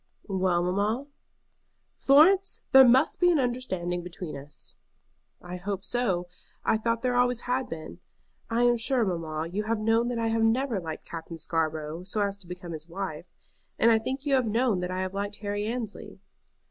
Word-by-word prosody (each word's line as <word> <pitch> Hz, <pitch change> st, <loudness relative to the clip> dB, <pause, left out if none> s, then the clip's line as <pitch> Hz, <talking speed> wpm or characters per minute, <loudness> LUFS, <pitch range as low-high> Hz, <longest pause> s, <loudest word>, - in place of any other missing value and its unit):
"Well, 185 Hz, -3 st, +1 dB
mamma?" 205 Hz, +8 st, 0 dB, 0.9 s
"Florence, 365 Hz, +8 st, +4 dB
there 265 Hz, -1 st, +9 dB
must 260 Hz, +5 st, +4 dB
be 355 Hz, -, +5 dB
an 340 Hz, -, +4 dB
understanding 240 Hz, -10 st, -2 dB
between 175 Hz, -1 st, -7 dB
us." 140 Hz, +1 st, -9 dB, 0.7 s
"I 180 Hz, 0 st, -7 dB
hope 195 Hz, +1 st, -4 dB
so. 195 Hz, -8 st, 0 dB, 0.4 s
I -, -, +3 dB
thought 230 Hz, +1 st, -1 dB
there 250 Hz, -1 st, +1 dB
always 245 Hz, -1 st, +2 dB
had 255 Hz, +1 st, -1 dB
been. 160 Hz, -1 st, -8 dB, 0.5 s
I 230 Hz, +1 st, +1 dB
am 240 Hz, 0 st, +4 dB
sure, 240 Hz, 0 st, +1 dB
mamma, 165 Hz, -3 st, -3 dB
you 210 Hz, +3 st, -2 dB
have 225 Hz, +1 st, 0 dB
known 225 Hz, +2 st, +2 dB
that 245 Hz, -1 st, -2 dB
I 230 Hz, 0 st, 0 dB
have 225 Hz, 0 st, +1 dB
never 230 Hz, 0 st, +2 dB
liked 160 Hz, -3 st, -7 dB
Captain 165 Hz, 0 st, -7 dB
Scarborough 160 Hz, 0 st, -2 dB
so 195 Hz, +4 st, -1 dB
as 200 Hz, -1 st, 0 dB
to 185 Hz, -, -9 dB
become 180 Hz, -1 st, -8 dB
his 160 Hz, +1 st, -7 dB
wife, 175 Hz, -2 st, -5 dB, 0.5 s
and 230 Hz, -, +5 dB
I 225 Hz, -, +4 dB
think 265 Hz, +5 st, -4 dB
you 285 Hz, -, +1 dB
have 255 Hz, -3 st, +3 dB
known 225 Hz, -2 st, +1 dB
that 180 Hz, 0 st, -3 dB
I 185 Hz, 0 st, -2 dB
have 185 Hz, 0 st, -3 dB
liked 200 Hz, +1 st, -3 dB
Harry 205 Hz, 0 st, -3 dB
Annesley." 225 Hz, -4 st, -5 dB
205 Hz, 185 wpm, -27 LUFS, 175-245 Hz, 0.9 s, there